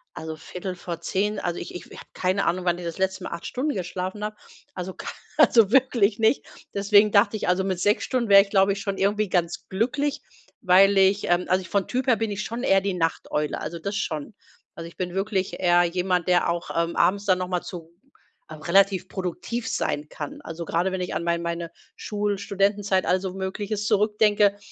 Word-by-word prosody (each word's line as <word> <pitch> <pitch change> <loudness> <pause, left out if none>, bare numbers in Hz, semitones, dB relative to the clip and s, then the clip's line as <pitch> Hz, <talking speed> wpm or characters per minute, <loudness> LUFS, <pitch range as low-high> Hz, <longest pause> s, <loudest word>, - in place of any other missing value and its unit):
Also 160 0 -6
21:45, 180 +4 -4
also 175 -1 -3
ich - - -8
ich 175 - -7
habe - - -14 0.2
keine 185 +2 0
Ahnung, 180 +1 0
wann 175 0 +2
ich 180 - -7
das 170 -1 -5
letzte 190 0 -1
Mal - - -6
8 170 - -6
Stunden 285 +4 -2
geschlafen 185 +2 -4
habe. 215 0 -4 0.4
Also 185 0 -5
k - - -10 0.3
also 225 -3 +5
wirklich 240 -5 +3
nicht, 225 +4 +2 0.3
deswegen 205 +1 +4
dachte 205 +1 +4
ich, 215 - -3
also 180 +1 +2
mit 190 -2 -2
6 205 +3 +2
Stunden 240 -4 -1
wäre 200 0 +9
ich, 200 - -14
glaube 195 -1 +3
ich, 200 - -6
schon 200 -1 -3
irgendwie 205 +2 +1
ganz 175 -2 -1
glücklich, 255 +8 -1 0.4
weil 195 +1 +5
ich, 195 +1 +4
ähm 175 +1 +2
also 185 +1 +2
vom 200 +1 -1
Typ 255 +1 -2
her 240 - +5
bin 225 -2 -2
ich 205 +1 -3
schon 235 +2 -5
eher 195 -6 +4
die 195 -1 -1
Nachteule, 165 -3 -1
also 165 +2 -5
das 200 +4 -4
schon. 155 +2 -3 0.4
Also, 165 0 -7
ich 170 - -15
bin 180 -1 -3
wirklich 195 0 -2
eher 175 -1 +4
jemand, 180 0 0
der 175 -1 +3
auch, 170 0 -3
ähm, 170 0 0
abends 200 +4 +2
dann 185 -3 +3
noch 185 - -3
mal 180 -1 -1
zu 165 -2 -9 0.6
relativ 185 +4 +2
produktiv 190 +6 -4
sein 150 +1 -2
kann. 145 -2 -7
Also 165 +1 -7
gerade, 175 +4 0
wenn 185 -1 -3
ich 180 - -3
an - - -2
mein 170 0 0
meine 170 0 -4 0.2
Schul 205 -1 -2
Studentenzeit, 200 -1 0
all 185 +1 +2
so 185 -1 -5
Mögliches 205 +2 -3
zurückdenke, 210 -1 +3
190 Hz, 205 wpm, -24 LUFS, 175-205 Hz, 0.6 s, wäre